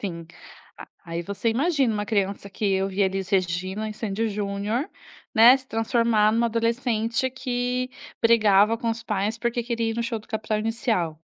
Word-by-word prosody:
sim. 170 -4 -5 0.8
Aí 170 0 -4
você 200 +5 -2
imagina 270 0 +1
uma 205 0 -2
criança 200 -2 -1
que 195 0 0
ouvia 195 0 +1
Elis 190 0 -3
Regina 185 +3 -1
e 215 - -7
Sandy& 220 +1 -2
Junior, 205 - -2 0.4
né. 235 +4 +8
Se 265 - -14
transformar 225 -1 +2
em - - +1
uma 235 - +3
adolescente 230 +1 0
que 250 0 -2 0.3
brigava 220 -2 +4
com 230 0 -2
os 225 0 -4
pais 210 +2 -1
porque 235 0 -1
queria 230 -1 -1
ir 225 - -7
no 235 - 0
show 230 -1 -2
do 215 - -17
Capital 220 -1 -2
Inicial. 215 - -1
220 Hz, 170 wpm, -24 LUFS, 200-235 Hz, 0.8 s, né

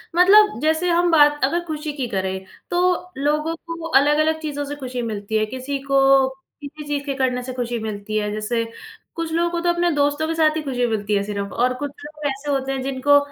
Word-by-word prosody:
मतलब 415 - +6
जैसे 315 +3 +1
हम 345 0 +3
बात 295 -2 +5
अगर 340 +6 +1
खुशी 305 -1 -4
की 260 -3 -2
करें, 190 -1 -3 0.2
तो 360 0 +1
लोगों 300 +3 0
को 335 0 -6
अलग-अलग 305 +3 +3
चीज़ों 290 -2 -3
से 290 - -5
खुशी 255 -3 -5
मिलती 220 -1 -2
है। 215 - +2
किसी 260 +5 -4
को 270 -1 +4 0.4
किसी 295 +1 -8
चीज़ 285 -1 -2
के 280 - -2
करने 250 -2 0
से 255 0 -6
खुशी 240 -1 -3
मिलती 215 -1 -4
है। 210 -1 -1
जैसे 215 +2 -1 0.5
कुछ 330 -1 -3
लोगों 340 +1 +2
को 345 - -1
तो 350 - +1
अपने 345 0 +2
दोस्तों 290 +1 +1
के 325 - -1
साथ 315 -1 +3
ही 315 - -1
खुशी 250 -4 -1
मिलती 210 -2 -1
है 200 - +1
सिर्फ़ 200 -1 -4
और 250 +1 +1
कुछ 290 -1 -3
लोग 300 0 -9
ऐसे 280 +1 -3
होते 270 -1 -1
हैं, 265 -1 -2
जिनको 275 +2 +3
285 Hz, 215 wpm, -22 LUFS, 245-315 Hz, 0.5 s, मतलब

